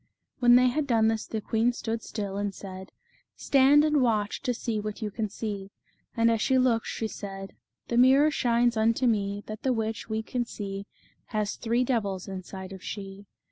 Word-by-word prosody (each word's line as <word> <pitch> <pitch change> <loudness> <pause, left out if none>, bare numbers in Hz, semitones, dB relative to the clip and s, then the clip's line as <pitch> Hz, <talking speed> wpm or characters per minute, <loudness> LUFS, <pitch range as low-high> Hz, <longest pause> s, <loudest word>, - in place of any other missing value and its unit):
When 240 -1 +6
they 250 0 +6
had 285 +3 -1
done 225 -3 +3
this 225 -1 -2
the 220 - -3
queen 230 +3 +1
stood 225 -1 -3
still, 205 -3 -5
and 200 -1 -2
said: 190 -1 -9 0.2
" - - -38
Stand 280 +2 +5
and 305 -1 +1
ivatch 220 -6 +1
to 255 - 0
see 230 -2 -2
what 210 +1 -5
you 210 - -3
can 215 +1 -3
see." 200 -2 -5 0.5
And 230 0 +4
as 225 -1 0
she 260 +2 +3
looked 245 -3 +2
she 225 - -3
said: 195 -2 -7 0.2
" - - -54
The 235 - 0
mirror 270 +5 +6
shines 240 -3 +2
unto 225 +3 +2
me 205 -3 0
That 215 0 -7
the 260 - +1
witch 225 -1 -3
we 220 0 -2
can 245 +2 -2
see 200 -3 -6 0.4
Has 215 -2 -2
three 235 +2 0
devils 205 -7 -1
inside 190 0 -7
of 190 - -10
she." 195 -1 -7
220 Hz, 200 wpm, -27 LUFS, 200-245 Hz, 0.5 s, When